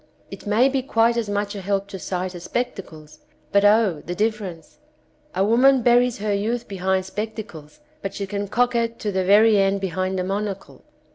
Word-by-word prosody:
It - - -9
may 220 +5 +4
be 270 -1 0
quite 235 -2 +2
as 230 -3 -2
much 205 0 -2
a 200 - -6
help 200 +1 -1
to 195 -2 -7
sight 185 0 -3
as 175 0 -9
spectacles, 160 -9 -5 0.3
but, 200 0 +3
O, 205 -6 +3
the 175 - -5
difference! 205 - -3 0.6
A 195 - +2
woman 250 +4 +4
buries 245 0 +3
her 210 0 -1
youth 230 +4 -2
behind 190 -1 -1
spectacles, 210 - -7 0.2
but 195 - -5
she 200 - -3
can 200 +1 -4
coquet 235 +1 +1
to 210 - -3
the 190 -1 0
very 210 +2 +5
end 195 0 +2
behind 185 0 -2
a - - -1
monocle. 195 +1 -4
200 Hz, 185 wpm, -22 LUFS, 190-225 Hz, 0.6 s, very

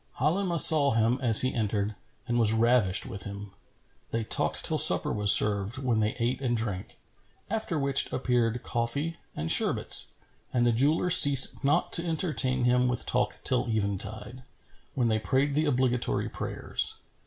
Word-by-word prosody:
Halimah 170 +5 -2
saw 145 -6 +6
him, 115 +3 -1
as 115 -4 +6
he 130 - -2
entered, 105 -2 -3 0.3
and 120 -1 -2
was 110 -2 +2
ravished 115 -4 0
with 100 - -8
him. 100 0 -10 0.6
They 115 0 -4
talked - - -1
till - - -1
supper - - +3
was 105 -1 +5
served 105 +3 +1
when 125 -5 -2
they 105 0 -2
ate 120 +2 -3
and 120 -3 -2
drank; 105 -5 -7 0.5
after 220 -7 -4
which 140 -1 0
appeared 120 -2 -2
coffee 140 +8 -4 0.2
and 80 +2 -4
sherbets, - - +2 0.4
and 120 -1 -1
the 120 - +1
jeweller 150 +9 -1
ceased 140 -5 +7
not 140 - -1
to 170 - +3
entertain 155 -7 0
him 125 +1 +1
with 125 -1 -3
talk - - -3
till 125 -1 -1
eventide, 105 +3 -3 0.5
when 125 -3 -1
they 110 -1 -1
prayed 135 +5 -2
the 155 +2 -1
obligatory 125 -3 -2
prayers. - - -5
120 Hz, 160 wpm, -26 LUFS, 110-140 Hz, 0.6 s, ceased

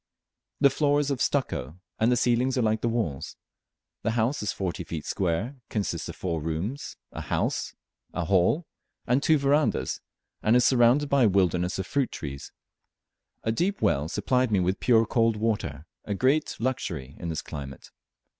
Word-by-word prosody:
The 140 -2 +6
floor 145 +1 +2
is 145 -1 0
of 135 - -2
stucco, 85 +5 -1 0.2
and 115 +2 +3
the 125 - +3
ceilings 125 +2 +2
are 125 - +2
like 110 0 +1
the 120 - +1
walls. 110 - -2 0.6
The 115 - 0
house 120 +6 +1
is 105 -1 -1
forty 90 -1 -3
feet 80 -2 -6
square, 100 +9 -1
consists 95 -7 -2
of - - -7
four 85 -4 -2
rooms, 80 - -4
a - - -6
hall, 95 - -1 0.4
and 125 +3 +2
two 155 +1 +4
verandahs, 140 - +1 0.4
and 110 +2 +3
is 125 -1 +5
surrounded 125 +4 +4
by 140 -3 +4
a - - +5
wilderness 90 -2 +1
of 95 - -3
fruit 140 +4 0
trees. 70 -2 -7 0.9
A 110 - +1
deep 185 - 0
well 75 +2 +1
supplied 125 +6 +1
me 100 - +3
with 90 +2 0
pure 115 -2 +4
cold 115 0 +2
water, 105 -10 -2 0.2
a 100 - -3
great 135 +8 +2
luxury 80 - -3
in 85 - -4
this 80 - -3
climate. 70 -3 -8
110 Hz, 165 wpm, -27 LUFS, 85-130 Hz, 0.9 s, The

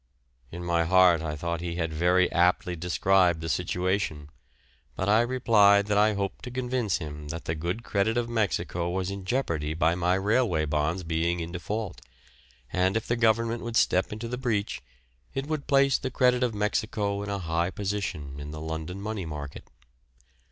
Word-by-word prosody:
In 85 +1 -7
my 85 -1 +2
heart 90 -1 +5
I 75 -2 -3
thought 85 +3 -3
he 85 -1 -4
had 80 -2 -2
very 90 +3 +3
aptly 90 0 +2
described 90 0 +2
the 80 - -5
situation, 90 -3 -1 0.6
but 95 - -2
I 105 +2 +5
replied 110 -5 +4
that 105 0 0
I 105 0 +4
hoped 100 -1 -3
to - - -5
convince 125 -5 -1
him 75 -3 -7
that 80 +2 -6
the 80 - -1
good 85 +8 -3
credit 110 +3 0
of 120 -1 0
Mexico 100 -6 -1
was 95 +1 -2
in 100 -1 -6
jeopardy 85 - -1
by 80 +1 +2
my 90 +1 +1
railway 100 -4 +1
bonds 75 +4 -1
being 85 +1 0
in 85 0 -5
default, 100 +3 -4 0.7
and 95 +3 +2
if 115 - -3
the 120 - 0
Government 115 0 +2
would 120 0 -2
step 95 - +2
into 110 +2 -5
the 125 +1 -4
breach 110 -6 -1 0.5
it 135 0 -2
would 155 -1 -3
place 140 -1 +4
the - - -3
credit 125 -1 +2
of 120 -3 0
Mexico 105 -1 -1
in 100 - -5
a 100 - -1
high 85 -1 -1
position 95 -9 -4
in 70 +1 -7
the 75 +1 -7
London 80 +3 -5
money 105 -3 -4
market. 75 -2 -7
95 Hz, 180 wpm, -27 LUFS, 85-110 Hz, 0.7 s, heart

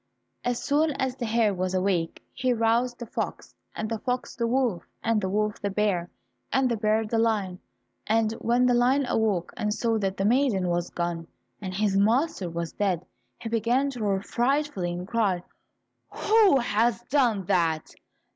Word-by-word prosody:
As 245 -1 -1
soon 300 +2 +2
as 265 -2 -2
the 245 -3 -4
hare 220 -2 +2
was 185 0 -2
awake, 185 -3 0
he 255 0 +1
roused 235 +2 +1
the 240 - -6
fox, - - -5 0.2
and 215 - -3
the 225 0 -3
fox, 250 +2 -3
the 235 -2 -1
wolf, 240 -7 0 0.2
and 225 -2 +1
the 190 - -1
wolf 210 +1 -1
the 200 - -1
bear, 195 -4 0 0.4
and 265 -2 +2
the - - +2
bear 215 0 +1
the 225 +1 0
lion. 205 -5 0 0.5
And 220 0 +2
when 245 +2 +2
the 250 - +4
lion 255 +3 +3
awoke 205 -8 0
and 210 0 -1
saw 225 +1 0
that 195 -1 -2
the 195 - 0
maiden 225 -6 +2
was 175 0 -1
gone, 170 -1 -3 0.3
and 185 -2 -5
his 205 -1 +1
master 225 - +2
was 170 -1 -4
dead, 185 -4 -1 0.3
he 225 - -6
began 240 +5 +1
to 250 - -8
roar 200 -3 0
frightfully 245 -7 0
and 175 +1 -5
cried, 200 -6 0 0.7
"Who 425 -8 +4
has 235 0 +1
done 240 -7 +1
that? 170 -4 +1
220 Hz, 175 wpm, -26 LUFS, 190-245 Hz, 0.7 s, the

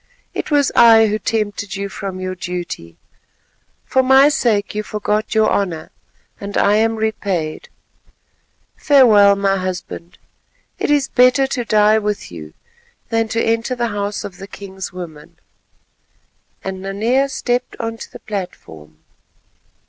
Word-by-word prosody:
It - - -4
was 290 -3 +2
I 225 -1 +7
who 215 0 -1
tempted 205 -3 -2
you 200 0 -3
from 195 -1 -6
your 185 0 -3
duty. 175 - -6 0.9
For 260 - +2
my 265 +2 +6
sake 225 -8 0
you 210 - -2
forgot 210 +1 -2
your 220 0 +4
honour, 170 -6 -2 0.5
and 200 0 -5
I 205 +1 +4
am 225 +1 +2
repaid. 200 -7 -3 1.1
Farewell, 215 -9 +5
my 195 0 +1
husband, 180 -2 -6 0.6
it - - -1
is 290 -2 +2
better 255 +2 +4
to 255 -3 -3
die 215 0 +4
with 210 - -3
you 80 -3 -10 0.5
than 225 -1 +1
to 230 +1 -1
enter 230 +3 0
the 240 -1 -1
house 205 -1 -3
of 185 - -8
the 195 - -9
king's 190 -1 -8
women," 170 -5 -10 1.3
and 190 -1 -5
Nanea 225 +8 0
stepped 250 -1 -2
on 225 0 -4
to - - -10
the - - -11
platform. 80 - -7
210 Hz, 140 wpm, -18 LUFS, 190-230 Hz, 1.3 s, I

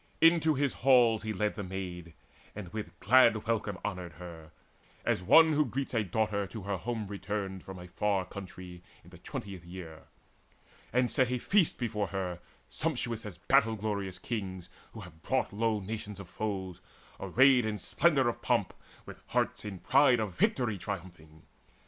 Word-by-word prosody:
Into 165 -2 +5
his 140 0 +1
halls 120 -4 +5
he 110 - -3
led 105 +1 0
the 105 - -5
Maid, 90 -3 -6 0.4
And 100 -3 -8
with 90 -6 -6
glad 115 0 +5
welcome 110 -4 -1
honoured 90 -5 -4
her, 80 -1 -10 0.6
as - - +1
one 160 - +6
Who 150 +1 +4
greets 135 +1 -4
a 115 -3 +2
daughter 100 +1 -1
to 110 +2 -8
her 100 0 -2
home 110 +3 -3
returned 100 -1 -4
From 95 -1 -9
a 90 0 -9
far 95 +1 0
country 90 -2 -9 0.2
in - - -17
the - - -13
twentieth 95 -3 -7
year; 85 -3 -10 0.9
And 125 +1 +2
set 130 -2 +2
a 125 - 0
feast 185 - +2
before 105 -4 -2
her, 90 -3 -3 0.3
sumptuous 120 -8 -3
As 95 -4 -9
battle 115 +4 +3
glorious 100 -3 -3
kings, 95 -6 -5 0.2
who - - -8
have 80 0 -13
brought 130 -1 -1
low 110 0 +1
Nations 105 0 -6
of 100 - -9
foes, 95 -2 -4 0.4
array 130 +7 +5
in 110 -3 -1
splendour 135 - +2
of 120 - -2
pomp, - - +1 0.3
With - - -11
hearts - - -1
in 100 -2 -5
pride 130 +4 +4
of 105 -4 -2
victory 125 - +1
triumphing. 85 -5 -7
105 Hz, 165 wpm, -30 LUFS, 95-120 Hz, 0.9 s, one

